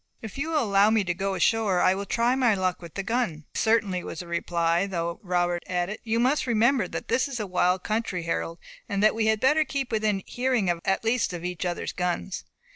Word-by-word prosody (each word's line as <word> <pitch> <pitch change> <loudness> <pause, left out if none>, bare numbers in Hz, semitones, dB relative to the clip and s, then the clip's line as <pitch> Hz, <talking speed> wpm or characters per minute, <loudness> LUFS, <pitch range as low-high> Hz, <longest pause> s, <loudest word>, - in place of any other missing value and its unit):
"If 220 -3 -7
you 280 +4 -3
will 310 -4 +2
allow 200 -1 +4
me 220 -1 +3
to 175 -2 -1
go 195 +2 -2
ashore 210 -2 +2
I 185 - +4
will 200 +1 -4
try 235 +1 +2
my 250 -5 +3
luck 185 -2 -1
with 170 -2 -11
the 195 - -2
gun." 205 -9 -1
"Certainly, 220 -5 +1
certainly," - - -9
was 160 - -6
the 175 - -10
reply; 170 +1 0
though 170 -2 -3
Robert 175 -2 0
added, 180 +4 -2
"You 225 0 0
must 260 +4 +2
remember 235 +3 +3
that - - -6
this 255 - +1
is 265 -4 -5
a 210 - -2
wild 180 0 +1
country, 215 -5 -2
Harold, 165 0 -2 0.3
and 200 0 0
that 215 - +5
we 220 -1 0
had 220 -1 +2
better 300 +6 +4
keep 275 -4 -3
within 215 -3 0
hearing 245 -6 0
at 175 +4 -1
least 225 -3 +1
of 175 0 -6
each 180 0 -3
other's 175 -1 -3
guns." 180 +1 -3
200 Hz, 225 wpm, -26 LUFS, 180-230 Hz, 0.3 s, that